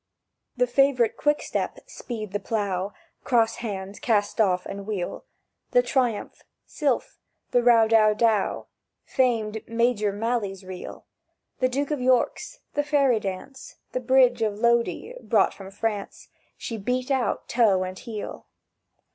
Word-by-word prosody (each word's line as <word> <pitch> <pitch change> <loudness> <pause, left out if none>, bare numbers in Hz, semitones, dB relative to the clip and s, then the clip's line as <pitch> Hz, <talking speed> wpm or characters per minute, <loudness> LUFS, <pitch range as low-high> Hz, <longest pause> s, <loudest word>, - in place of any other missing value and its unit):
The 250 - +4
favourite 250 -2 +3
Quick 295 0 +1
step - - -2
"Speed 215 -5 -7
the 205 - -1
Plough"— 200 -3 -2 0.3
(Cross 230 -2 +2
hands, 200 -3 -5
cast 215 -1 +1
off, 180 -3 +2
and 200 0 -7
wheel)— 200 - -4 0.5
"The - - +5
Triumph," 245 - -1 0.2
"Sylph," 280 -5 -1 0.3
"The 245 - +4
Row 235 -2 +5
dow 220 -1 +5
dow," 220 -2 +1 0.4
Famed 225 -4 0
"Major 230 -2 +1
Malley's 205 -2 -2
Reel," 185 -1 -8 0.5
"The 255 - +2
Duke 280 +3 -2
of 295 -4 -1
York's," 250 -1 +1
"The 290 - +1
Fairy 280 -5 +2
Dance," 200 +7 -7 0.2
"The - - -1
Bridge 250 -1 +4
of 210 -2 0
Lodi" 235 - +1
(brought - - +2
from 195 -1 -10
France), 205 0 -4 0.3
She 225 -2 -5
beat 250 +6 -1
out, 260 -3 0
toe 210 -6 +3
and 185 0 -6
heel. 220 -4 -7
225 Hz, 140 wpm, -25 LUFS, 205-250 Hz, 0.5 s, The